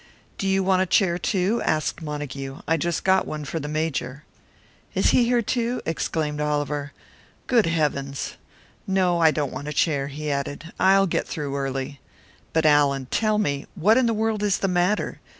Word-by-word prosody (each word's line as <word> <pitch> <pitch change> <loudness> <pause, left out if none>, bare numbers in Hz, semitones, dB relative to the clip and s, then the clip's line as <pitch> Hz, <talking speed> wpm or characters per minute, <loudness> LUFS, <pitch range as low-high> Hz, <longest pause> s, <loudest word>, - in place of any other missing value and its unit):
"Do 195 - -1
you 195 0 +2
want 185 0 +3
a 190 - +1
chair, 175 -2 +2
too?" 195 +5 0
asked 155 +1 0
Montague. 145 -2 -5
"I 165 - +3
just 170 +1 -1
got 190 0 +3
one 150 -1 -5
for 160 +3 -3
the 145 - -5
Major." 150 -3 -2 0.7
"Is - - +3
he 245 - +4
here, 240 0 +2
too?" 240 +2 -1
exclaimed 155 -2 -2
Oliver. 145 -1 -1 0.5
"Good 235 -7 +3
Heavens! 140 -4 -1 0.5
No, 185 -3 +2
I 165 -1 +6
don't 150 -3 -1
want 145 - -6
a 150 - -3
chair," 145 -3 +1
he 150 +1 -4
added, 145 +4 -4
"I'll 195 +1 +5
get 180 - -1
through 145 -3 -4
early. 135 0 -3 0.5
But, 160 -1 +1
Allan, 140 -3 +3
tell 215 -1 +2
me 145 -9 -1
what 200 +5 +4
in 255 -1 +3
the 230 - +1
world 220 -1 0
is 205 -2 +2
the 195 - -1
matter? 180 +3 0
160 Hz, 180 wpm, -24 LUFS, 145-195 Hz, 0.7 s, I